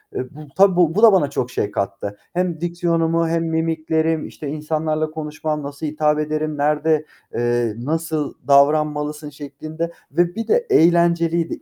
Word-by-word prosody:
Eee, 130 - -3
bu, 150 0 -12
tabii 195 -2 +5
bu 175 -1 +3
bu 215 - +2
da 220 -3 +9
bana 145 -7 +3
çok 125 -3 -3
şey 105 - -2
kattı. 100 +1 -3 0.2
Hem 175 -2 -1
diksiyonumu, 170 -1 0
hem 165 0 0
mimiklerim, 160 0 0
işte, 150 - -8
insanlarla 155 +1 -2
konuşmam, 155 -1 -4
nasıl 140 +2 -6
hitap 150 0 +1
ederim, 155 0 -2
nerede, 150 +1 +1 0.3
eee, 120 -2 0
"Nasıl 155 +2 -2
davranmalısın?" 150 +1 +2
şeklinde 155 +3 -6 0.2
ve 175 +3 +1
bir 225 - -4
de 470 +2 +2
eğlenceliydi, 170 0 +3
155 Hz, 150 wpm, -21 LUFS, 150-165 Hz, 0.3 s, da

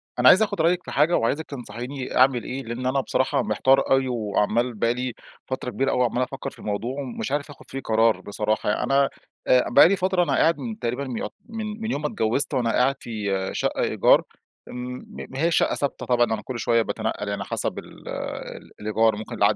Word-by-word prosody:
أنا 125 +1 +6
عايز 205 - +7
آخد 195 -6 -1
رأيك 175 +2 +2
في - - -8
حاجة، 155 +4 +3
وعايزك 145 +7 0
تنصحيني 130 0 -6
أعمل 130 -2 +4
إيه، 135 +5 -5
لأن 120 +2 -5
أنا 135 +2 +2
بصراحة 130 +1 0
محتار 135 +1 +2
أوي، 135 0 +4
وعمال 115 +1 0
بقى 115 +2 +1
لي 125 0 -3 0.3
فترة 130 -1 -4
كبيرة 135 +2 0
أوي 125 - +2
عمال 120 +2 0
أفكر - - -5
في - - -18
الموضوع، 120 +7 -3
ومش 130 0 -5
عارف 145 +1 -1
آخد 145 - -13
فيه 135 - -4
قرار 110 -4 +2
بصراحة. 105 +1 -1
أنا 140 0 +3 0.4
آآ 125 -1 +5
بقى 125 - +8
لي 195 - +3
فترة 185 -1 +1
أنا - - 0
قاعد 165 +1 +3
من 225 -3 -5
تقريبًا 125 +3 -2
يعت 105 - -4 0.2
من 220 -1 -5
من 225 +1 -2
يوم 145 - -2
ما 150 - 0
اتجوزت 120 +4 0
وأنا 120 -4 +1
قاعد 130 +3 +2
في 100 -4 -2
شقة - - -1
إيجار، - - +4 0.5
امم، 125 +1 -6
ما 135 - -8
هياش 165 +2 +2
شقة - - +2
ثابتة 140 - -2
طبعًا 120 -1 +3
أنا 110 -2 -2
كل 120 +3 -6
شوية 115 0 +3
باتنقل 110 -1 -3
يعني 100 - -2
حسب - - -3
ال - - -14 0.7
الإيجار، 110 +1 +2
ممكن 110 +3 -7
العقد 105 -1 +3
125 Hz, 205 wpm, -24 LUFS, 115-140 Hz, 0.7 s, بقى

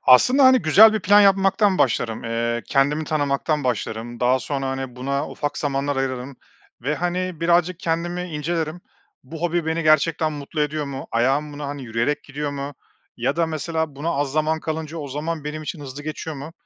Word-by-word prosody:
Aslında, 250 - +6
hani, 260 0 +7
güzel 215 +8 +7
bir 215 - -1
plan 205 +2 +6
yapmaktan 195 0 +4
başlarım. 115 -2 0
Eee, 115 +1 -1
kendimi 145 +3 +2
tanımaktan 145 0 0
başlarım. 120 -1 -3
Daha 125 +1 +3
sonra, 135 +2 -3
hani, 130 -2 -4
buna 140 +3 -2
ufak 145 0 -3
zamanlar 140 -1 -1
ayırırım 130 0 -3 0.5
ve, 145 +5 0
hani, 180 0 -2
birazcık 175 +1 +2
kendimi 175 +2 -1
incelerim. 165 0 -3 0.4
Bu 155 +5 -9
hobi 175 -1 0
beni 160 +1 0
gerçekten 155 +1 +3
mutlu 145 +1 -5
ediyor 150 0 0
mu? 140 -1 -6
Ayağım 135 +6 +1
buna, 145 0 -6
hani, 145 -1 -6
yürüyerek 120 +6 -1
gidiyor 145 +1 -4
mu? 140 0 -5 0.4
Ya 130 +6 -1
da 170 - +2
mesela 160 -1 -3
buna 150 +4 -3
az 140 -3 -1
zaman 155 +1 +1
kalınca 160 0 -4
o 145 - -5
zaman 150 +3 -4
benim 155 +1 -5
için 155 +1 -6
hızlı 140 0 -8
geçiyor 155 0 -5
mu? 140 +4 -8
150 Hz, 180 wpm, -22 LUFS, 135-165 Hz, 0.5 s, hani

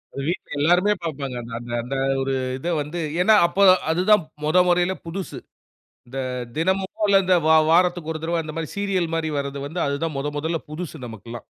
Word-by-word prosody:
ஒரு 140 - -4
வீட்ல 175 - -3
எல்லாருமே 180 +7 +4
பாப்பாங்க. 140 -5 -4
அந்த 115 0 -10
அந்த 120 0 -9
அந்த 130 +3 -4 0.3
ஒரு 135 0 -1 0.2
இத 150 +6 -6
வந்து 155 +4 -5 0.2
ஏன்னா 215 +4 +6
அப்ப 180 - -6 0.3
அது 165 +2 +1
தான் 210 -5 +6 0.2
மொத 155 +4 +2
முறையில 175 +1 +2
புதுசு. 185 +3 -6 0.7
இந்த 135 +2 -6 0.4
தினமோ 190 +4 +1 0.2
இல்ல 200 -1 +6
இந்த 185 0 +3
வா 160 - +6 0.2
வாரத்துக்கு 175 -2 +2
ஒரு 160 - -6
தடவ 170 0 0
அந்த 155 - -7
மாரி 160 -2 -3
சீரியல் 190 -5 0
மாரி 160 -1 -1
வரது 140 0 -3
வந்து, 160 +5 -5
அது 140 - -1
தான் 160 -3 -2
முதல் 145 +1 -3
முதல்ல 160 +3 -1
புதுசு 160 +1 -6
நமக்குல்லாம். 115 +1 -9
165 Hz, 190 wpm, -23 LUFS, 140-180 Hz, 0.7 s, ஏன்னா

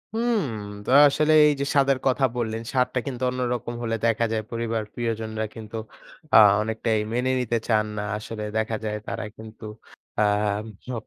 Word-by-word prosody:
হুম। 230 -1 +1 0.4
তো - - -5 0.2
আসলে 155 +2 +2
এইযে 140 -1 0
স্বাদের 135 -1 +4
কথা 130 +1 +3
বললেন, 110 -1 -2
স্বাদটা 125 0 +1
কিন্তু 130 -1 -4
অন্যরকম 125 -2 -2
হলে 115 -1 -1
দেখা 115 0 +2
যায় 110 -1 -1
পরিবার 115 -1 -2
প্রিয়জনরা 110 -2 -3
কিন্তু 110 0 -9 0.6
আ - - +11 0.2
অনেকটাই 110 0 -1
মেনে 125 +2 +1
নিতে 120 -2 0
চান 110 -2 +2
না। 105 - -2
আসলে 105 0 -6
দেখা 110 0 0
যায় 105 0 -2
তারা - - -4
কিন্তু 110 0 -11 0.5
আম 105 0 +1 0.3
হ - - -4
115 Hz, 155 wpm, -24 LUFS, 110-125 Hz, 0.6 s, আ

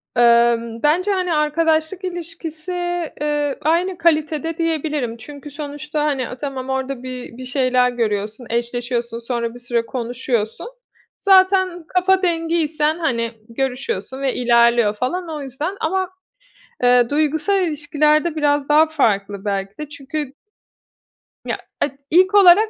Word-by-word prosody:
Emm, 235 0 +3
bence, 360 +7 +3
hani, 365 -3 0
arkadaşlık 315 +4 +1
ilişkisi, 350 0 -4
ııı, 295 -1 0
aynı 340 +4 +1
kalitede 320 0 +1
diyebilirim 305 -7 -1
çünkü 285 +4 -10
sonuçta, 295 +1 -4
hani, 270 -5 -1
a, 250 - -7
tamam, 265 -1 -5
orada 265 -1 -3
bir 250 -2 -7
bir 255 - -7
şeyler 255 -1 +2
görüyorsun, 220 0 -2
eşleşiyorsun, 235 0 -2
sonra 235 -1 -3
bir 245 - -11
süre 240 -1 -1
konuşuyorsun. 240 - -3 0.5
Zaten 375 -3 +4
kafa 370 +1 +2
dengiysen, 325 -2 0
hani, 235 -8 0 0.2
görüşüyorsun 260 -1 -3
ve 270 -2 0
ilerliyor 235 -2 +4
falan 330 - -2
o 305 -2 -5
yüzden. 290 +9 -4
Ama, 375 +3 0 0.7
eee, 245 -1 +5
duygusal 310 +6 +1
ilişkilerde 300 +1 +1
biraz 290 -1 +1
daha 305 +2 +6
farklı 205 -9 0
belki 195 0 -2
de 300 -1 -6
çünkü 290 -1 -5 1.1
Ya, - - -2 0.2
ed 290 - +1 0.2
ilk 375 +4 +5
olarak 400 +3 +7
290 Hz, 125 wpm, -20 LUFS, 245-330 Hz, 1.1 s, olarak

